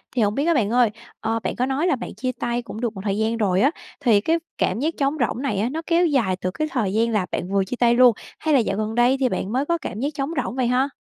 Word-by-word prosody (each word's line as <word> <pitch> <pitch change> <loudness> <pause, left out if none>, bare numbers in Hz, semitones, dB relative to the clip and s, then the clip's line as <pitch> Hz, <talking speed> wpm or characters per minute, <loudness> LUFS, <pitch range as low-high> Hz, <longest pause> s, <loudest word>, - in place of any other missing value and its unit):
Thì 240 - +2
hổng 210 0 +1
biết 280 - 0
á 340 - +3
bạn 225 -8 +1
ơi, 240 -1 +3 0.3
ờ, 225 +1 -1
bạn - - -2
có 250 - 0
nói 275 +6 0
là 290 - +3
bạn 245 - -7
chia 255 0 -2
tay 240 0 -1
cũng 225 0 -8
được 230 -2 -1
một 190 - -6
thời 200 -1 -1
gian 220 +1 0
rồi 195 -3 +2
á, 280 +4 +4 0.3
thì 225 -7 +4
cái 325 +7 +2 0.2
cảm - - 0
giác 315 +5 0
trống 280 +2 +1
rỗng 245 - -5
này 235 -8 -1
á, 225 - 0
nó 320 +4 -4
kéo 345 +1 +3
dài 250 - +1
từ 185 - -1
cái 310 +11 -2
thời 210 -7 -1
gian 230 +2 +2
là 210 -4 +1
bạn 180 - -3
vừa 195 -1 +2
chia 250 - -4
tay 240 -1 +3
luôn 250 -1 +7 0.3
hay 310 -2 0
là 270 - +6
dạo 205 -3 -1
gần 215 +1 -2
đây 245 +3 +4
thì 260 -2 +2
bạn 195 - -3
mới 265 +4 0
có 340 +1 +1
cảm 220 - -6
giác 280 +3 0
trống 280 +1 -3
rỗng - - -5
vậy 255 -2 +1
ha? 255 +3 +2
240 Hz, 310 wpm, -23 LUFS, 215-275 Hz, 0.3 s, luôn